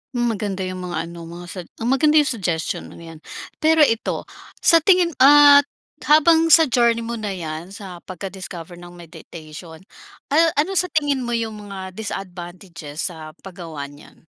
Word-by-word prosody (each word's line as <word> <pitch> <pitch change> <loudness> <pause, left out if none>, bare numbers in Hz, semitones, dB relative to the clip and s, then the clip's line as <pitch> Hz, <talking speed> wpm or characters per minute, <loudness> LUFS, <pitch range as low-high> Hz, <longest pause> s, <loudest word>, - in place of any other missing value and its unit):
Hmm, 240 -1 +1
maganda 200 -3 -4
yung 185 0 -5
mga 175 - -4
ano 170 -1 -10
mo, 175 +1 -10
mga - - -10
sug 180 -3 -8
ah, - - -8
maganda 280 +5 +2
yung 295 -3 +4
suggestion 175 -8 -3
mong - - -13
'yan. 165 -1 -11 0.4
Pero 315 0 +4
ito 230 -5 0 0.4
sa 335 - +6
tingin 355 0 +3
ah, 285 +1 +8 0.5
habang 320 +2 +5
sa 325 +1 +7
journey 235 -1 +2
mo 230 0 -5
na 205 -3 -4
'yan 160 -1 -6
sa 185 -4 -9
pagka-discoverng 175 -2 -9
meditation, 160 0 -12 0.5
ah, 325 +2 +3
ano 300 +7 +1
sa 360 - -1
tingin 290 -5 0
mo 240 -1 -2
yung 220 -2 -5
mga 190 -1 -7
disadvantages 180 -5 -7
sa 155 -2 -11
paggawa 170 -6 -8
niyan? 145 +3 -18
195 Hz, 165 wpm, -21 LUFS, 175-280 Hz, 0.5 s, ah